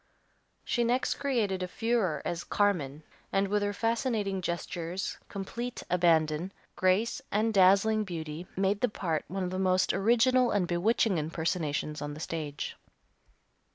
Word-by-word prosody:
She 240 - +1
next 245 +2 +1
created 225 -9 0
a 180 - -2
furore 205 -7 0
as 170 0 -2
Carmen, 155 -8 0 0.3
and 195 0 +2
with 205 +1 +1
her 205 0 0
fascinating 225 -3 -1
gestures, 175 +1 -3
complete 235 +5 -5
abandon, 170 0 +2 0.2
grace, 195 +8 +1
and 220 +2 +1
dazzling 200 +3 +5
beauty 165 -2 -6
made 195 +1 +1
the 250 - +3
part 165 -6 -2
one 190 +2 -3
of 180 - -2
the 185 - -2
most 185 -1 +2
original 240 +5 +4
and 200 -5 +1
bewitching 190 +2 +2
impersonations 155 -1 -2
on 145 0 -4
the - - -9
stage. 155 -3 -4
190 Hz, 140 wpm, -29 LUFS, 170-220 Hz, 0.3 s, dazzling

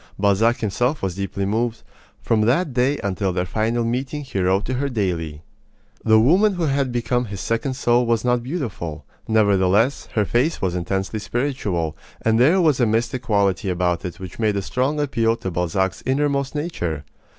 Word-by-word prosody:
Balzac 105 +5 +2
himself 120 +6 0
was 95 -2 -1
deeply 100 +1 -3
moved. 110 +2 -1 0.4
From 110 -1 +2
that 130 +7 +2
day 130 +4 +2
until 95 -1 -1
their 90 0 -1
final 115 +5 0
meeting 130 +5 -2
he 130 -8 -4
wrote 95 +3 +2
to 130 - -2
her 140 +2 -1
daily. 85 - -2 0.6
The 110 0 +5
woman 185 - +4
who 175 - -2
had 140 -3 +1
become 120 +1 0
his 100 -3 -7
second 115 +6 -1
soul 120 -2 +2
was 115 0 +1
not 125 -1 +2
beautiful. 115 - -5 0.2
Nevertheless, 105 +3 +2
her 105 -2 +2
face 125 - +1
was 95 -2 -1
intensely 95 +4 -2
spiritual, 105 - -2 0.3
and 110 0 +3
there 155 +10 +5
was 155 -7 +3
a 120 - +3
mystic 115 +3 0
quality 100 -4 +1
about 90 -1 0
it 90 +2 -6
which 95 0 -9
made 110 -2 +1
a 100 - -2
strong 130 +8 -1
appeal 115 -6 +1
to 105 -5 -5
Balzac's 90 +2 -1
innermost 140 +1 0
nature. 90 - -3
115 Hz, 175 wpm, -22 LUFS, 95-130 Hz, 0.6 s, The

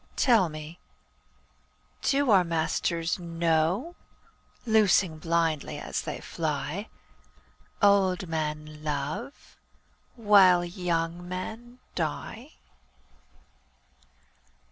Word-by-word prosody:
Tell 225 -9 +4
me, 155 +2 -9 1.2
do 280 -3 +2
our 190 -3 +6
masters 165 +1 -1
know, 170 - 0 0.7
Loosing 200 -7 +3
blindly 165 -2 0
as - - -4
they - - -5
fly, 155 +5 -3 0.9
Old 195 -2 +3
men 155 -1 -4
love 150 - -5 0.6
while 195 -6 +5
young 175 -1 -2
men 225 +7 -6 0.2
die? 75 - -4
170 Hz, 75 wpm, -27 LUFS, 160-200 Hz, 1.2 s, our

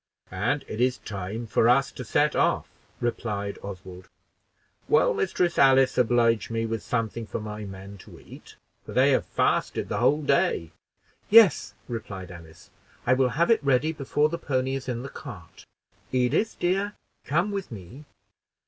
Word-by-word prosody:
"And 120 +10 -1
it 110 - -4
is 125 0 +2
time 105 +3 -6
for 115 +1 +2
us 135 +3 +3
to 125 - -8
set 150 +4 +1
off," - - +1 0.3
replied 105 -4 -3
Oswald. 95 -2 -9 0.8
"Will - - +4
Mistress 175 -1 0
Alice 135 -1 +5
oblige 115 -2 +2
me 115 0 -1
with 115 -1 -3
something 115 -1 -3
for - - -4
my 105 0 -6
men 95 +1 -10
to - - -14
eat, - - -14 0.3
for - - -9
they - - +4
have - - +1
fasted - - 0
the 105 - -1
whole 145 +6 +2
day." 140 - +1 0.6
"Yes," 215 -7 +6
replied 100 -6 -6
Alice; 85 -2 -14 0.3
"I 125 - +4
will 130 0 +2
have 170 +6 +3
it 225 - +3
ready 140 +3 +2
before 145 +1 0
the 170 - -4
pony 130 -1 -1
is 135 -1 -4
in 120 0 -3
the - - -5
cart. 95 -9 -11 0.4
Edith, 130 - +1
dear, 195 +3 0 0.3
come 175 +8 +1
with 195 -6 -4
me." 110 - -10
120 Hz, 160 wpm, -26 LUFS, 105-140 Hz, 0.8 s, Yes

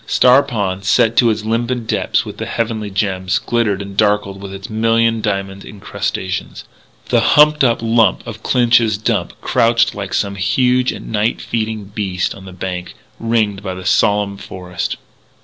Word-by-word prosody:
Star 125 +2 +5
Pond, 100 -8 -3
set 115 +3 +3
to 120 - +5
its 110 -1 -2
limpid 120 +1 -1
depths - - 0
with - - -8
the - - -5
heavenly 110 -2 -2
gems, 95 -1 -1
glittered 105 -3 -1
and 100 0 -9
darkled 105 -2 +1
with 100 -1 -7
its 95 0 -8
million 115 +1 +1
diamond 100 -2 -3
incrustations. 95 -2 -4 0.5
The - - +4
humped 150 0 +5
up 115 -2 +2
lump 115 0 +2
of 115 -2 -8
Clinch's 115 -4 +3
Dump 110 - -1
crouched 115 0 +2
like 100 -2 -4
some 100 -1 0
huge 125 +6 +2
and - - -9 0.3
feeding 110 -1 -3
night 100 - -18
beast 95 -4 -2
on 95 - -13
the 95 - -9
bank, 90 -1 -6 0.2
ringed 110 -4 0
by 95 -3 -5
the 90 0 -9
solemn 100 +1 +2
forest. 90 -2 -5
105 Hz, 165 wpm, -17 LUFS, 95-115 Hz, 0.5 s, Star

